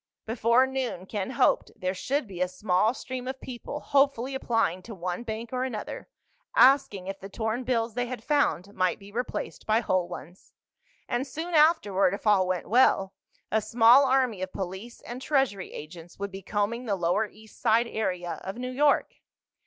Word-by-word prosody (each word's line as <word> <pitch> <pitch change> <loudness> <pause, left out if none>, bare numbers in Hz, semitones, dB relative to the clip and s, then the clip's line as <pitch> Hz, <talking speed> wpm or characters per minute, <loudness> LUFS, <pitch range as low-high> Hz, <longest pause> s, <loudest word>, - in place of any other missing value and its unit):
Before 235 +3 +3
noon, 265 -8 -3
Ken 200 +1 -3
hoped, 255 - +2
there 185 -1 -2
should 275 +9 -1
be 185 -4 -8
a 180 - +3
small 185 +4 +1
stream 255 -1 -6
of 265 0 -4
people 260 +4 -7
hopefully 275 -2 +2
applying 225 -8 0
to 220 +3 -9
one 180 +2 -3
bank 225 +1 -6
or 255 0 0
another, 235 -5 -5 0.5
asking 255 -8 +5
if 195 +1 -5
the 195 - -9
torn 225 +4 -2
bills 230 -2 0
they 245 +1 -1
had 245 -2 -6
found 230 - +1
might 185 -2 +1
be 200 0 -14
replaced 245 +3 -4
by 220 +1 +4
whole 185 -6 0
ones. 175 +3 -11 0.5
And 255 +2 -1
soon 330 +5 -5
afterward—if 210 - +3
all 200 -3 +4
went 185 -1 -2
well—a 220 -2 +1
small 240 +5 +6
army 255 -7 +2
of 185 0 -3
police 190 +5 -6
and 245 +2 -8
Treasury 265 -10 0
agents 165 +2 -10
would 200 0 -4
be 195 +1 -7
combing 210 +5 -2
the 205 -4 0
lower 180 +4 +1
east 220 +1 -18
side 230 +2 +4
area 180 -7 -3
of 190 +3 -5
New 250 +1 -4
York. 285 +3 +2
220 Hz, 175 wpm, -27 LUFS, 190-255 Hz, 0.5 s, small